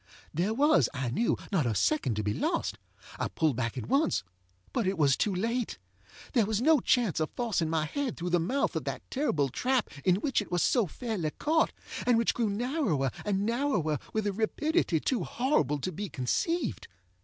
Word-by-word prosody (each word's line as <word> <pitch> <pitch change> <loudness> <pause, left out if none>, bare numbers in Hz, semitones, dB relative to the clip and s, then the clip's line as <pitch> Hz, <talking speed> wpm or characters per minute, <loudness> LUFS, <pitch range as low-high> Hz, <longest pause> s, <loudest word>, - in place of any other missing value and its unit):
There 175 +7 0
was, 275 - +4
I 125 -2 -2
knew, 230 - +1
not 165 -10 +2
a 110 - 0
second 210 - +1
to 105 - -2
be 105 0 0
lost. - - -1 0.4
I - - 0
pulled 155 -5 0
back 115 +1 -2
at - - -3
onceŌĆöbut 95 - -2
it 190 0 0
was 140 -4 +4
too 200 -3 0
late. 230 +5 -1 0.6
There 230 -6 +3
was 215 -1 0
no 305 +4 +5
chance 235 -8 +2
of 155 - 0
forcing 210 -10 0
my 160 -1 +1
head 270 - -3
through 175 0 -3
the 175 - +4
mouth 255 +12 0
of - - -2
that - - -4
terrible 160 - +1
trap 255 - 0
in 180 -2 +4
which 245 +4 0
it 205 - -9
was 175 -1 +2
so 235 -7 +3
fairly 205 - -3
caught, 315 - +1 0.4
and 245 -2 +5
which 230 - +2
grew 230 -3 0
narrower 205 - 0
and 200 -1 0
narrower 230 - 0
with 220 -1 -1
a 205 - 0
rapidity 220 - +1
too 255 - 0
horrible 200 - +1
to 145 +7 -3
be 200 +4 -5
conceived. 240 - -1
200 Hz, 190 wpm, -29 LUFS, 150-245 Hz, 0.6 s, no